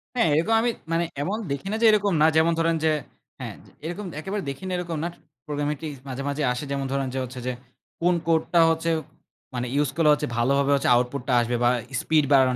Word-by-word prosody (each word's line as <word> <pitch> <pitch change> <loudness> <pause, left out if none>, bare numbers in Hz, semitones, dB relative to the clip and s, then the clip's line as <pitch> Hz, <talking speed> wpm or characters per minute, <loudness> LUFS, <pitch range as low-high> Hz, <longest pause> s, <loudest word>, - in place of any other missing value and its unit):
হ্যাঁ। 230 - +3
এরকম 170 +8 +2
আমি 240 - +2 0.2
মানে 170 +1 +2 0.2
এমন 205 +6 -1
দেখি 140 +7 -3
না - - 0
যে - - +5
এরকম 205 -3 +2
না। - - +7
যেমন 165 +1 +4
ধরেন 165 0 +2
যে 155 - +4 0.5
হ্যাঁ? - - -6 0.3
এরকম 175 +5 -4
একেবারে 195 +3 -3
দেখি 135 +7 -7
না - - -3
এরকম 170 -3 -3
না - - 0 0.4
প্রোগ্রামিং 145 0 -2
টি 160 - -4 0.2
মাঝে, 135 +1 -4
মাঝে, 145 +1 -2
আসে 125 +4 -5
যেমন 140 -1 -1
ধরেন 135 -1 0
যে 135 - -1
হচ্ছে 125 0 -7
যে, - - +1 0.5
কোন 175 +1 +3
কোডটা 165 +1 +2
হচ্ছে 165 +1 0 0.7
মানে 125 0 -2
ইউস 145 -2 +2
করলে 150 -3 +3
ভালোভাবে 140 +3 +2 0.2
আউটপুট 125 +2 0
টা 130 - +1
আসবে 120 +1 -1
বা 120 - +5 0.3
স্পিড 155 -2 +3
বাড়ানোর 130 -2 +5
150 Hz, 205 wpm, -25 LUFS, 135-170 Hz, 0.7 s, না